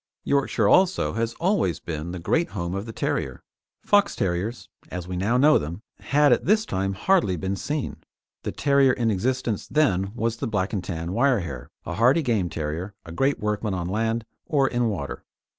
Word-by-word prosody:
Yorkshire 135 -6 +1
also 185 - +3
has 115 0 -2
always 165 - +1
been 80 0 -5
the 90 - -5
great 160 - 0
home 85 0 -2
of 100 +3 -4
the - - -5
terrier. 65 - -2 0.4
Fox 205 0 +3
terriers, 95 +6 -2 0.2
as 90 0 -5
we 90 - -4
now 100 +7 +1
know 150 +4 +6
them, 85 +8 -6 0.2
had 145 -2 +4
at - - 0
this 215 +3 +3
time 95 +1 -1
hardly 105 - +2
been 95 +4 -2
seen. 145 +7 -3 0.4
The - - -3
terrier 140 -2 +3
in 115 -3 +1
existence 120 +1 -1
then 100 -10 +2
was 115 -1 -1
the - - -3
Black 105 -2 -1
and 95 -4 -1
Tan 85 -2 -4
wire 125 -1 +3
hair, 70 -8 -7 0.2
a 85 - -4
hardy 125 - +4
game 110 -9 +1
terrier, 80 +5 -4
a 85 - -9
great 135 +11 +1
workman 105 -1 -1
on 90 -1 -3
land 110 +3 -1 0.2
or 140 -5 +3
in 120 -2 +1
water. 80 -10 -5
110 Hz, 190 wpm, -25 LUFS, 90-135 Hz, 0.4 s, know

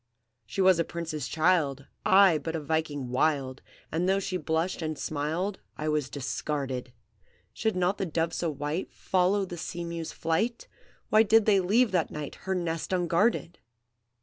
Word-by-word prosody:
"She 155 - -2
was 185 -2 +5
a - - +4
Prince's 165 -3 -4
child, 155 -5 +1 0.2
I 190 -4 +6
but 160 +1 -4
a - - -1
Viking 150 -3 -2
wild, 135 0 0 0.3
And 175 +4 0
though 195 - +3
she 195 -1 -3
blushed 170 +1 -1
and 155 -1 -3
smiled, 160 +8 -2 0.2
I 155 0 -2
was 150 -3 0
discarded! 135 -2 -3 0.6
Should 220 -2 -1
not 185 +2 +1
the 195 - -1
dove 165 +1 -1
so 170 - -1
white 150 +4 -3
Follow 190 +2 +1
the 175 -2 -7
sea 175 +1 -5
mew's 170 -1 -5
flight? 220 +9 -1 0.4
Why 215 - +6
did 225 0 +5
they 205 -3 +5
leave 215 +6 +3
that 180 -3 +1
night 150 -1 -6 0.2
Her 190 - +2
nest 165 -2 -2
unguarded? 175 0 +1
165 Hz, 165 wpm, -28 LUFS, 150-185 Hz, 0.6 s, I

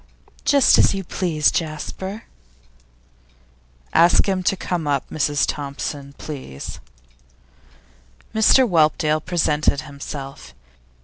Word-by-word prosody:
'Just 280 -2 +5
as - - +4
you 195 - -3
please, 170 -4 +1
Jasper.' 185 +6 -4 1.7
'Ask 170 +5 +5
him 190 -1 0
to 185 +1 0
come 175 -4 -3
up, 140 -2 0
Mrs 145 -1 +1
Thompson, 140 0 -5
please.' 130 - -8 1.5
Mr 230 +4 +5
Whelpdale 155 -3 +2
presented 155 -4 +1
himself. 140 - -9
155 Hz, 90 wpm, -21 LUFS, 145-185 Hz, 1.7 s, Just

